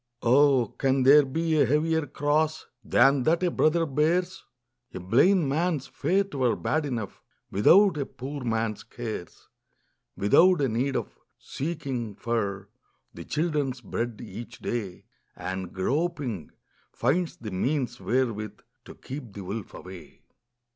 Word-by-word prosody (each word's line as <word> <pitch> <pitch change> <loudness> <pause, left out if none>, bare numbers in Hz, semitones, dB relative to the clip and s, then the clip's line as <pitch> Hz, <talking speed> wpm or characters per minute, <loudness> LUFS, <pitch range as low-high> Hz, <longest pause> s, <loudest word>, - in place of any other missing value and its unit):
Oh, 130 -2 +4
can 135 -1 +2
there 145 +3 +8
be 160 +3 0
a - - +5
heavier 155 +2 +1
cross 150 +3 0 0.2
Than 135 +2 +4
that 165 +7 +1
a 175 - +2
brother 165 +1 +2
bears? 165 +6 0 0.5
A - - -4
blind 140 - +3
man's 155 0 0
fate 195 +2 -1
were 130 -4 +1
bad 155 -1 -1
enough 115 -7 -5 0.3
Without 180 - +5
a 140 - -2
poor 135 +2 -7
man's 115 -2 -1
cares; 110 -7 -7 0.7
\V 100 - -1
ithout 180 - +6
a 140 - +2
need 130 +5 -1
of 120 - -4 0.2
seeking 135 - -4
for 100 -4 -3 0.4
The 85 - -9
children's 150 -5 -1
bread 115 0 -4
each 115 +3 -9
day, 100 -7 -5 0.3
And 95 -1 -5
groping, 135 - -2 0.4
finds 160 +8 0
the 110 -3 -7
means 125 +5 -1
wherewith 115 -4 -2 0.2
To - - -11
keep 130 -4 -8
the 100 - -7
wolf 100 +3 -6
away. 90 -2 -12
135 Hz, 135 wpm, -26 LUFS, 115-155 Hz, 0.7 s, there